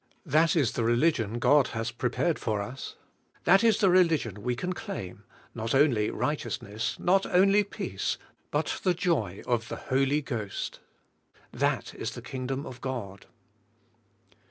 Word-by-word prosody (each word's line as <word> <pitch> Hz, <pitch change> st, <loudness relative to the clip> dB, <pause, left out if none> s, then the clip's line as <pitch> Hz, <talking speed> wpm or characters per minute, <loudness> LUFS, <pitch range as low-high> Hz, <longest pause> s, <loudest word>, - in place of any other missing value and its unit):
That 155 Hz, +2 st, +3 dB
is 140 Hz, -8 st, +3 dB
the 120 Hz, -, -2 dB
religion 120 Hz, -2 st, +2 dB
God 140 Hz, +3 st, +4 dB
has 115 Hz, +1 st, -2 dB
prepared 125 Hz, +7 st, 0 dB
for 110 Hz, -2 st, -1 dB
us; 125 Hz, +7 st, -6 dB, 0.5 s
that 195 Hz, +5 st, +5 dB
is 225 Hz, -3 st, +5 dB
the 195 Hz, -, +4 dB
religion 160 Hz, -, +2 dB
we 125 Hz, +2 st, -1 dB
can 180 Hz, +9 st, -3 dB
claim; 100 Hz, -, -7 dB, 0.3 s
not 115 Hz, +2 st, -2 dB
only 125 Hz, -7 st, +4 dB
righteousness, 115 Hz, -6 st, -3 dB
not 195 Hz, +2 st, +3 dB
only 195 Hz, +3 st, +4 dB
peace, 200 Hz, -, -3 dB, 0.3 s
but -, -, -1 dB
the 180 Hz, -2 st, +2 dB
joy 160 Hz, -, -1 dB
of 115 Hz, -2 st, 0 dB
the -, -, -4 dB, 0.2 s
Holy 135 Hz, +3 st, +2 dB
Ghost. 110 Hz, -7 st, -4 dB, 0.7 s
That -, -, -1 dB
is -, -, -5 dB
the -, -, -8 dB
Kingdom 130 Hz, +1 st, -4 dB
of 125 Hz, -2 st, -9 dB
God. 110 Hz, -7 st, -5 dB
130 Hz, 145 wpm, -28 LUFS, 115-165 Hz, 0.7 s, that